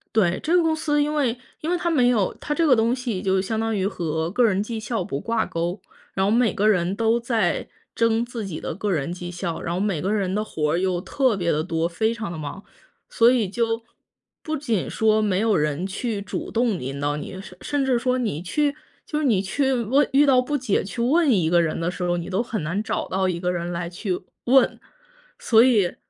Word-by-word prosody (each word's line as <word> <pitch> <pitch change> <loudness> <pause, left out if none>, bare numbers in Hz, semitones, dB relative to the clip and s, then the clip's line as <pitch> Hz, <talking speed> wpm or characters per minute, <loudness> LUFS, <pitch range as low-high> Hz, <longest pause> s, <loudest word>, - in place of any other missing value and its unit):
对， 180 -5 +3
这 330 +3 +1
个 355 - +5
公 325 -1 +2
司 295 -2 +1
因 295 +1 0
为 260 -6 +1 0.3
因 320 - -2
为 - - +2
它 345 0 -1
没 255 -7 +3
有 215 -6 +2
它 295 - -2
这 330 +2 +1
个 260 - +6
东 230 +2 +2
西 245 -6 -3
就 190 -1 +1
相 220 +3 -2
当 225 0 0
于 195 -1 0
和 160 -4 -2
个 245 +7 +2
人 195 -3 +2
绩 220 +1 -4
效 220 -2 -2
不 140 -5 -4
挂 230 +5 0
钩， 175 +3 -3 0.3
然 190 - 0
后 195 - +2
每 230 -3 +3
个 210 - +1
人 185 -2 +2
都 225 +2 +2
在 230 -6 0 0.3
争 230 0 +2
自 235 -3 -5
己 175 -5 -6
的 - - -4
个 205 +2 -2
人 155 -2 -1
绩 175 0 -6
效， 175 -1 -4
然 170 - -3
后 180 - -1
每 195 -5 0
个 195 +5 -1
人 195 -3 0
的 210 - 0
活 150 -7 -1
儿 - - +2
又 180 -1 0
特 255 +4 +1
别 175 -3 0
地 155 +1 0
多， 165 +1 -1
非 220 +6 0
常 220 -6 -5
地 170 - -6
忙， 155 +6 -6 0.5
所 230 +1 +5
以 230 -6 +1
就 225 +2 -1 0.6
不 310 - -2
仅 235 - -1
说 220 -1 +2
没 205 -3 +1
有 220 0 +2
人 150 +3 0
去 210 +1 -3
主 200 - -5
动 230 -5 +1
引 135 +2 -5
导 145 +1 -1
你， 185 +5 -7
甚 195 -3 -12
甚 290 -1 -1
至 260 -2 +2
说 255 +1 0
你 215 - -2
去， 290 - 0 0.3
就 300 - -2
是 305 - 0
你 215 -8 +3
去 265 +8 0
问 255 +4 +2
遇 285 +2 +5
到 260 -2 +5
不 255 +4 -1
解 255 -8 0
去 195 +4 -5
问 295 +5 +3
一 180 -8 +2
个 175 0 +4
人 165 -2 0
的 165 +1 -1
时 180 0 -5
候， 175 0 +1
你 170 +1 -5
都 195 +5 0
很 230 -3 -4
难 170 +7 -2
找 - - -2
到 190 0 0
一 175 -2 -1
个 180 0 0
人 175 0 -3
来 170 0 -3
去 180 +1 -3 0.2
问。 260 +2 +4 0.6
所 225 -1 +5
以 215 -8 +3
210 Hz, 260 characters per minute, -23 LUFS, 180-245 Hz, 0.6 s, 个